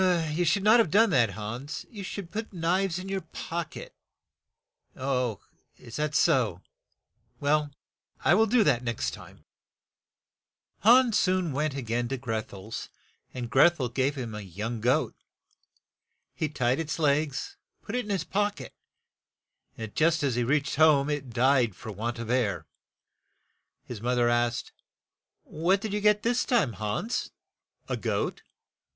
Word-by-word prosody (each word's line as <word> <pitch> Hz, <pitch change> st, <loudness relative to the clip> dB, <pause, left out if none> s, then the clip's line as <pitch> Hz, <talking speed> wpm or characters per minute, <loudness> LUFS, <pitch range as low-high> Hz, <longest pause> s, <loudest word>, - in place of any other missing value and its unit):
"You 175 Hz, +3 st, 0 dB
should 190 Hz, +4 st, +2 dB
not 220 Hz, +3 st, +6 dB
have 225 Hz, -, +3 dB
done 215 Hz, +5 st, +4 dB
that, 120 Hz, -6 st, +4 dB
Hans; 115 Hz, +8 st, -6 dB
you 210 Hz, -, -8 dB
should 190 Hz, -2 st, -6 dB
put 220 Hz, +2 st, -5 dB
knives 180 Hz, +1 st, 0 dB
in 185 Hz, +1 st, -6 dB
your 195 Hz, 0 st, -2 dB
pock 165 Hz, +1 st, -6 dB
et." -, -, -9 dB, 1.8 s
"Is 115 Hz, -, -11 dB
that 150 Hz, 0 st, -1 dB
so? 125 Hz, -, +2 dB, 0.8 s
Well, 150 Hz, +1 st, +1 dB, 0.6 s
I 155 Hz, -, +6 dB
will 220 Hz, +4 st, +4 dB
do 230 Hz, +1 st, +4 dB
that 140 Hz, -9 st, +3 dB
the 125 Hz, -, -12 dB
next 115 Hz, -2 st, -1 dB
time. -, -, -13 dB, 0.7 s
" -, -, -57 dB
Hans 235 Hz, -1 st, +5 dB
soon 185 Hz, -3 st, +1 dB
went 150 Hz, +1 st, -1 dB
a 135 Hz, -, -4 dB
gain 120 Hz, +1 st, -1 dB
to 135 Hz, +2 st, -3 dB
Greth 120 Hz, -1 st, -4 dB
el's, 100 Hz, +3 st, -7 dB, 0.4 s
and 125 Hz, -2 st, -5 dB
Gretn 170 Hz, +5 st, +5 dB
el 125 Hz, -2 st, -1 dB
gave 135 Hz, +4 st, 0 dB
him 120 Hz, -5 st, -5 dB
a 105 Hz, -, -5 dB
young 105 Hz, +5 st, -5 dB
goat. 125 Hz, +3 st, +2 dB, 1.2 s
He 155 Hz, -, -2 dB
tied 125 Hz, -2 st, 0 dB
its 160 Hz, -1 st, -3 dB
legs 145 Hz, -2 st, 0 dB, 0.2 s
and -, -, -36 dB
put 200 Hz, -, -6 dB
it 250 Hz, -, 0 dB
in 210 Hz, -, -10 dB
his 195 Hz, -5 st, 0 dB
pock 205 Hz, -3 st, -1 dB
et, 130 Hz, -, -9 dB, 1.0 s
and 110 Hz, -2 st, -6 dB
just 165 Hz, 0 st, +2 dB
as 135 Hz, -3 st, +1 dB
he 120 Hz, +1 st, 0 dB
reached 140 Hz, +3 st, 0 dB
home 150 Hz, -2 st, +5 dB
it 140 Hz, -3 st, -3 dB
died 120 Hz, -3 st, +2 dB
for 110 Hz, -, -8 dB
want 115 Hz, +4 st, -4 dB
of 115 Hz, 0 st, -4 dB
air. 120 Hz, -5 st, 0 dB, 1.2 s
His 115 Hz, -4 st, -8 dB
moth 125 Hz, +1 st, 0 dB
er 120 Hz, -1 st, +3 dB
asked, 120 Hz, 0 st, 0 dB, 0.3 s
' -, -, -65 dB
' -, -, -55 dB
What 175 Hz, +5 st, +1 dB
did 210 Hz, 0 st, -4 dB
you 210 Hz, -, -1 dB
get 210 Hz, 0 st, +3 dB
this 245 Hz, +1 st, +2 dB
time, 215 Hz, -, +1 dB
Hans? 110 Hz, -, -2 dB, 0.3 s
" -, -, -47 dB
"A -, -, -2 dB
goat. -, -, -2 dB
145 Hz, 170 wpm, -27 LUFS, 120-185 Hz, 1.8 s, not